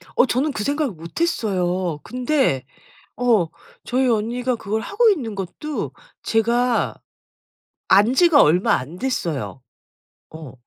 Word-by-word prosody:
어 - - +5
저는 270 +4 0
그 215 - -4
생각을 285 -1 -1
못했어요. 180 - -2
근데 250 - 0 0.5
어 230 -9 +3 0.4
저희 255 +1 0
언니가 240 +3 0
그걸 220 0 -3
하고 450 - +2
있는 245 - -1
것도 195 - -5 0.3
제가 235 +2 +1 0.9
안 205 +6 +5
지가 330 0 +6
얼마 175 +5 +3
안 150 +8 -6
됐어요. 170 - -3 0.7
어. 155 -4 -10
230 Hz, 220 characters per minute, -21 LUFS, 180-265 Hz, 0.9 s, 지가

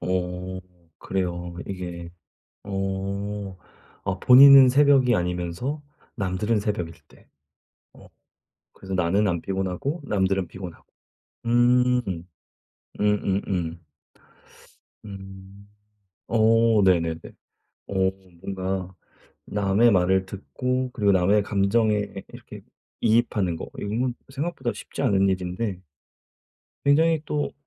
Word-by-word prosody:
어 90 0 -3 0.4
그래요. 90 -2 -3
이게 90 -3 -6 0.5
어 100 0 -4 0.5
아 95 0 -2
본인은 135 +2 +9
새벽이 135 -2 +4
아니면서 90 - -3 0.3
남들은 105 +2 -1
새벽일 90 -5 -3 0.2
때. - - -22 0.7
어 - - -16 0.7
그래서 95 0 -8
나는 95 +3 +1
안 85 -1 -1
피곤하고 95 - -3
남들은 95 -5 0
피곤하고. 90 -1 -10 0.6
음. 125 +1 +3 1.0
음음음. 95 -5 -1 1.3
음. 95 0 -11 0.6
어 115 -1 +4
네네네. 85 -3 +2 0.7
어 - - -6 0.5
뭔가 95 -1 -4 0.5
남의 105 +3 +2
말을 95 0 +2
듣고 125 +6 -3
그리고 105 -5 +2
남의 95 +3 +3
감정에 105 +1 +1 0.2
이렇게 - - -12 0.4
이입하는 105 -6 +1
거 - - -7
이거는 120 +5 -2 0.2
생각보다 135 -3 -3
쉽지 - - -7
않은 100 -1 +3
일인데. 95 +1 -2 1.1
굉장히 160 +2 +4
또 145 -1 -2
100 Hz, 205 characters per minute, -24 LUFS, 95-115 Hz, 1.3 s, 본인은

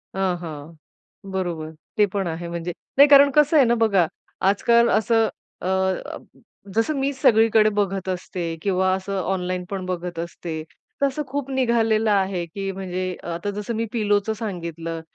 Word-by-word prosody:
हां, 190 -2 0
हां. 160 -1 -8 0.5
बरोबर. 170 -4 -3 0.3
ते 210 - +6
पण 195 -3 -1
आहे 170 +1 -4
म्हणजे. 170 +1 -4 0.3
नाही 285 +1 +9
कारण 280 0 +8
कसं 300 +1 +5
आहे 275 - +6
ना 235 0 +3
बघा, 195 -6 +3 0.4
आजकाल 235 +3 +4
असं 225 0 +3 0.3
अ - - -3 1.1
जसं 225 +8 +2
मी 275 +1 +1
सगळीकडे 220 -4 +4
बघत 195 -1 -1
असते 175 -2 -3
किंवा 185 -1 +1
असं 190 0 -3
ऑनलाईन 185 -1 -2
पण 190 -2 -4
बघत 175 -2 -4
असते. 165 -1 -5 0.4
तसं 280 +2 +1
खूप 275 0 -4
निघालेलं 225 -4 +2
आहे 190 -3 +1
की 195 +3 -5
म्हणजे 185 -1 -4 0.2
अ, - - -8
आता 170 +4 -3
जसं 210 +3 -4
मी 230 +1 -1
पिलोचं 210 -1 +1
सांगितलं. 170 -6 -5
195 Hz, 155 wpm, -23 LUFS, 175-225 Hz, 1.1 s, नाही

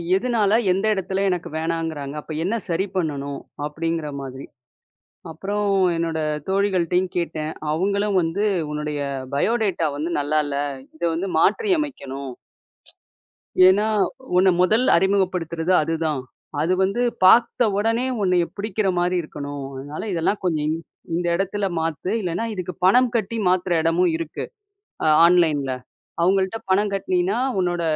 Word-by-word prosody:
எதுனால, 215 -1 +1 0.2
எந்த 195 +3 0
இடத்துல 190 0 -1
எனக்கு 180 -2 -2
வேணாங்குறாங்க, 160 -3 -3
அப்ப 160 - -11
என்ன 195 +6 0
சரி 180 +2 0
பண்ணணும்? 145 -5 -2 0.3
அப்பிடிங்கிற 160 +1 -3
மாதிரி. 135 0 -7 0.8
அப்பறம், 200 +5 -2 0.2
என்னோட 165 -1 -1 0.3
தோழிகள்ட்டேயும் 185 -2 +1
கேட்டேன். 160 -3 -2 0.2
அவுங்களும் 200 +4 +1
வந்து, 170 +4 -1 0.3
"உன்னுடைய 150 0 -3 0.3
பயோடேட்டா 195 0 +1
வந்து 155 +4 -3
நல்லா 145 +2 0
இல்ல. 140 -1 -3 0.4
இத 165 - -10
வந்து 175 +4 -2
மாற்றி 425 - +2
அமைக்கணும்." 140 - -5 1.4
ஏன்னா, 200 +3 +3 0.5
உன்ன 190 +1 +5
முதல் 220 +7 +3
அறிமுகப்படுத்துறது 180 -2 +1
அதுதான். 155 -3 -1 0.4
அது 165 +4 +1
வந்து 200 +6 0 0.2
பார்த்த 230 +4 +5
உடனே, 225 +4 +1 0.2
உன்னைய 180 -3 +2
பிடிக்கிறமாரி 190 -4 0
இருக்கணும். 145 -2 -6
அதனால 145 +3 -6
இதெல்லாம் 175 +4 0
கொஞ்சம் 160 -4 0
இந் 160 +1 -1 0.4
இந்த 175 0 -1
இடத்துல 195 +2 -1
மாத்து. 165 +2 -2
இல்லன்னா, 180 +3 -2
இதுக்கு 180 -2 -5
பணம் 245 +6 +5
கட்டி 230 +1 -2
மாத்துற 185 0 +1
இடமும் 170 +2 +2
இருக்கு, 165 -1 -5 0.6
அ - - +3 0.2
ஆன்லைன்ல. 160 -6 +3 0.5
அவுங்கள்ட்ட 190 +4 +1
பணம் 200 +2 +2
கட்டுனின்னா, 190 +2 0 0.2
உன்னோட 175 -1 -1
180 Hz, 125 wpm, -22 LUFS, 160-195 Hz, 1.4 s, உன்ன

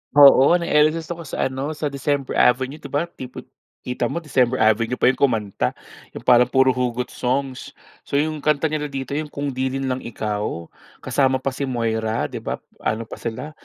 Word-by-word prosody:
Oo 140 +2 +8
na-LSSe 160 -1 +2
ako 170 -1 -5
sa 130 - -1
ano, 140 +4 -4
sa 150 -1 -3
December 140 0 -1
Avenue 130 +4 +2
'di 140 - -9
ba 145 +4 0
tipo 130 -1 -9 0.4
kita 125 - -2
mo 170 - -2
December 130 -4 +1
Avenue 110 +2 +3
pa - - +4
'yong 130 - -10
kumanta 105 - +1 0.4
'yong - - -9
parang 125 0 +6
puro 130 +1 +4
hugot 125 -1 -1
songs. 130 +1 -2 0.4
So - - -3
'yong 155 +1 -1
kanta 150 +1 +2
nila 150 -1 -1
dito 135 -1 -5
'yong 150 0 -3
"Kung 145 0 -3
'Di 130 0 -2
rin 135 -1 -2
Lang 130 0 -2
Ikaw", 105 -6 -3 0.4
kasama 130 -1 +2
pa 135 +1 -2
si 140 - -3
Moira 110 -3 -1
'di - - -6
ba, - - -3 0.2
ano 110 +1 -1
pa - - -7
sila, 115 +6 -5
130 Hz, 190 wpm, -22 LUFS, 120-145 Hz, 0.4 s, Oo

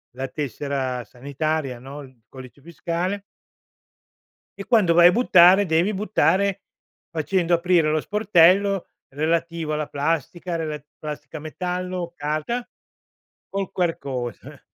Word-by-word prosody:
la 135 +1 -4
tessera 135 -2 -3
sanitaria, 140 +2 -3
no, 140 +3 -9
il 130 -3 -17
codice 130 +1 -12
fiscale 175 +5 -3 1.4
e 200 - -4
quando 205 -8 +4
vai 175 +1 +8
a 180 - +3
buttare, 190 -4 +6
devi 170 +6 +2
buttare 200 -1 +1 0.5
facendo 170 +2 0
aprire 170 -2 +2
lo 155 - +1
sportello 195 -1 +3 0.2
relativo 165 +2 -1
alla 150 0 -2
plastica, 165 +4 -2
relat 155 -2 -4
plastica, 150 0 -7
metallo, 180 +2 -4
carta 155 +12 -3 0.8
col 195 -1 -3
QR 175 -2 0
code. 125 -5 -6
165 Hz, 115 wpm, -23 LUFS, 145-185 Hz, 1.4 s, vai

